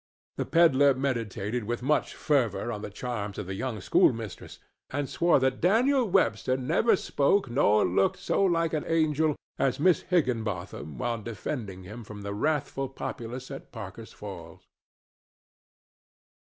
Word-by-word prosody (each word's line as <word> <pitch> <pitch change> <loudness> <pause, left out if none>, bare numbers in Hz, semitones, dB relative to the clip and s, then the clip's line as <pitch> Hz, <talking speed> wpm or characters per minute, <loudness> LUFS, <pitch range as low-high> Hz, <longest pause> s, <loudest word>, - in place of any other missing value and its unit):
The - - -2
pedler 145 -5 +5
meditated 115 -4 -2
with 120 +2 -3
much 150 +2 +1
fervor 120 -6 0
on 105 - -5
the - - -5
charms 105 -2 -5
of - - -4
the 95 - -5
young 115 +2 -3
schoolmistress, 110 +2 +1 0.3
and 145 +1 -2
swore 170 +2 +3
that 130 0 0
Daniel 240 - +3
Webster 130 - +2
never 160 - +3
spoke 145 -3 +1
nor 105 -5 +4
looked 95 +2 +2
so - - 0
like 165 -3 +2
an 155 - 0
angel 155 -2 +2 0.2
as 135 -1 +1
Miss 180 +3 +4
Higginbotham 110 - -2
while 115 - -2
defending 105 -3 -5
him 110 +6 -9
from 105 -1 -9
the 100 0 -4
wrathful 135 +2 -1
populace 125 -1 -6
at - - -9
Parker's - - -8
Falls. - - -10
130 Hz, 140 wpm, -28 LUFS, 105-155 Hz, 0.3 s, pedler